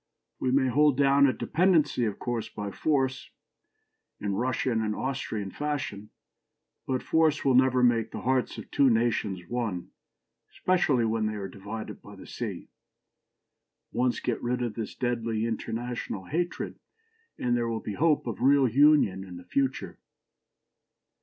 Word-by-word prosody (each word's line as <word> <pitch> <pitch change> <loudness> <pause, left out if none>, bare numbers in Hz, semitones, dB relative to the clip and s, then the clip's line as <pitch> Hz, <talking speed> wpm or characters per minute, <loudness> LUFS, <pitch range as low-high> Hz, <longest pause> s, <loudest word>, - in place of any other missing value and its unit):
We 130 - 0
may 130 +1 +3
hold 145 +1 +3
down 140 0 +5
a - - +3
dependency, 155 - +2
of 105 -3 -2
course, 120 -2 -3
by 105 -1 -5
force, 130 +1 0 0.9
in 100 -1 -2
Russian 120 +1 0
and 105 -1 -1
Austrian 110 -7 -3
fashion; 135 -8 -4 0.8
but 130 -1 -1
force 160 -2 +2
will 135 - +4
never 130 0 +4
make 115 -2 +3
the - - -7
hearts 130 0 0
of - - -9
two 140 -2 +4
nations 110 -6 0
one, 115 -8 -3 0.6
especially 150 -10 +1
when 110 -1 0
they 110 - -3
are 100 -2 -4
divided 100 +4 -7
by - - -12
the - - -12
sea. - - -6 1.2
Once 125 0 0
get 120 - -2
rid 125 +1 -1
of 120 -3 -2
this 110 -1 -5
deadly 115 -2 -1
international 115 -3 -4
hatred, 175 - -3 0.6
and 120 -1 0
there 120 -1 0
will 115 -1 -2
be 105 - -5
hope 155 +4 +2
of 115 -4 -5
real 135 +1 +5
union 130 -7 +4
in 90 -2 -9
the 90 - -12
future." 125 -4 -2
120 Hz, 150 wpm, -28 LUFS, 110-135 Hz, 1.2 s, down